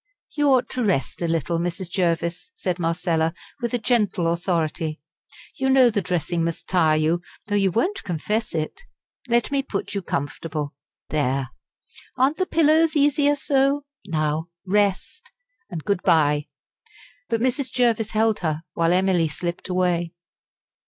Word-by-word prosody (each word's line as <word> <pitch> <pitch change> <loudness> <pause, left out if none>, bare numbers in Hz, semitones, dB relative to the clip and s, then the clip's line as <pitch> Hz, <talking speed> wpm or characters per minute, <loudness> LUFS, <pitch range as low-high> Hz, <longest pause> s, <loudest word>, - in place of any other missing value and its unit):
"You 295 -1 +1
ought 260 -2 +4
to 255 - -2
rest 180 - 0
a 170 - 0
little, 165 +1 0
Mrs. 175 +1 -3
Jervis," 170 - -1
said 180 - -2
Marcella, 165 -1 0 0.3
with 240 0 0
gentle 205 -8 +2
authority. 165 -2 -1 0.6
"You 265 0 0
know 260 -2 +6
the 205 - 0
dressing 175 -1 -1
must 165 0 -3
tire 160 -4 +3
you, 160 +3 +1 0.2
though 205 - -4
you 195 -1 +3
won't 355 - 0
confess 205 +5 -2
it. 155 -1 -3 0.5
Let 235 +1 +2
me 280 -1 +2
put 200 -6 -4
you 200 - -1
comfortable. 145 -1 -3 0.4
There; 135 -3 0 0.7
aren't 265 +4 +3
the 370 - 0
pillows 320 0 +3
easier 290 0 +3
so? 280 0 +1 0.2
Now 155 -1 -1 0.2
rest 200 0 0 0.4
and 165 -4 -5
good 200 -3 0
bye." 150 -2 +3 0.8
But 230 - +1
Mrs. 260 +2 0
Jervis 230 -3 +2
held 220 0 +2
her, 160 -2 -2
while 165 +1 +2
Emily 185 -3 +3
slipped 170 +4 -5
away. 180 -2 0
180 Hz, 145 wpm, -23 LUFS, 165-240 Hz, 0.8 s, know